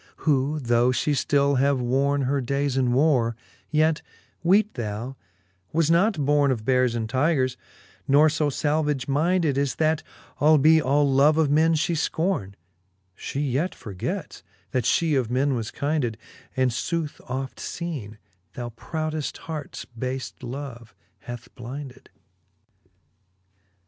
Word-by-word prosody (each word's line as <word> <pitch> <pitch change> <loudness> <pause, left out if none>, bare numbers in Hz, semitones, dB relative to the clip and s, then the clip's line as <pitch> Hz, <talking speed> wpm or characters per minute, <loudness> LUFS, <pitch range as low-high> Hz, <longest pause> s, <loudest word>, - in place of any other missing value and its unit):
who 145 0 +2
though 120 -1 +2
fhe 130 +4 +1
ftill 140 -1 +2
have 140 0 +2
worne 135 +3 +1
Her 135 +2 0
days 140 +2 -1
in 130 -1 +2
warre_, 125 -3 +3 0.3
yet, 155 +1 +2 0.4
weete 200 +5 +3
thou, 115 +3 -4 0.6
was 165 0 +2
not 170 -3 +3
borne 145 0 +3
Of 115 -5 -1
beares 125 -2 +2
and 115 -1 -2
tygres, 130 0 +1 0.5
nor 145 +3 +6
io 155 -1 +2
falvage 150 -2 0
mynded, 155 0 +1
As 140 -2 0
that, 160 0 +1 0.4
albe 155 +1 +5
all 145 +1 +2
love 140 +3 +4
of 155 -3 +3
men 160 +2 +4
fhe 170 +3 0
fcorne, 160 - -1 0.6
She 135 +8 -4
yet 145 +6 -1
forgets, 95 -4 -5 0.3
that 125 -3 0
(he 165 -2 +2
of 130 -5 +1
men 135 +3 +1
was 115 -3 -2
kynded: 140 -6 -1 0.4
And 130 -1 +3
footh 155 +5 -3
oft 130 +1 -4
feene^ 140 - -5 0.4
that 120 -1 -6
proudeft 155 +3 -3
harts 155 -3 -7
bale 130 +3 -4 0.2
love 125 -2 -7 0.2
hath 120 0 -8
blynded. 130 +2 -8
140 Hz, 135 wpm, -25 LUFS, 125-155 Hz, 0.6 s, nor